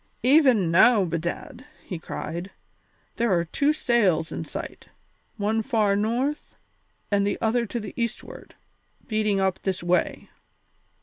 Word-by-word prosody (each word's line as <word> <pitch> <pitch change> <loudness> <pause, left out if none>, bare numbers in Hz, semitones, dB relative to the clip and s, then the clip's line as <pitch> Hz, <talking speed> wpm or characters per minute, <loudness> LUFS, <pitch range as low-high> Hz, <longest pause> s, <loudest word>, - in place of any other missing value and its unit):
"Even 255 - +4
now, 205 +3 +5
bedad," 175 - -4 0.2
he 180 - -5
cried, 170 +3 -6 0.7
"there 235 -2 +1
are 170 -2 +2
two 280 - +1
sails 210 - +1
in - - -4
sight - - -8 0.5
one 215 +2 0
far 215 -4 +1
north, 240 +8 -1 0.6
and 200 0 +3
the 200 - 0
other 235 +1 +1
to 235 - -3
the 210 -3 -7
eastward, 235 -1 -5 0.5
beating 215 -3 0
up 190 -1 0
this 185 -2 -2
way. 175 0 0
210 Hz, 130 wpm, -25 LUFS, 185-240 Hz, 0.7 s, now